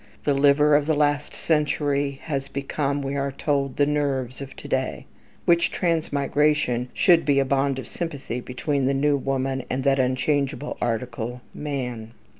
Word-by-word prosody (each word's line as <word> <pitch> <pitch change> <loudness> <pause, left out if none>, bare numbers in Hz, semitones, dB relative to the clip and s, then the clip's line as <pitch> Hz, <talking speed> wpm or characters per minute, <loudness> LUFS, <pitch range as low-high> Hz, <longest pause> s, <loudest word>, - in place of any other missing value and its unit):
The 145 - +2
"liver" 145 +2 +5
of 145 0 +2
the 160 - +2
last 145 0 +1
century 145 -3 0
has 140 -3 -3
become, 140 0 -2
we 135 +1 -3
are 140 0 -1
told, 140 -1 -1
the 145 - +4
"nerves" 140 -3 -1
of 135 -1 -8
to - - -10
day; - - -2 0.4
which 170 0 +4
transmigration 145 -6 +1
should 170 -3 +5
be 145 -1 +2
a 135 - +3
bond 135 0 +1
of 130 - -6
sympathy 140 -8 -4
between 130 +2 -1
the 135 - +1
new 145 +1 +3
woman 135 -1 -1
and 130 +1 -1
that 135 0 +3
unchangeable 135 +3 0
article, 120 +1 -3
man. 125 -6 -4
140 Hz, 160 wpm, -24 LUFS, 130-145 Hz, 0.4 s, liver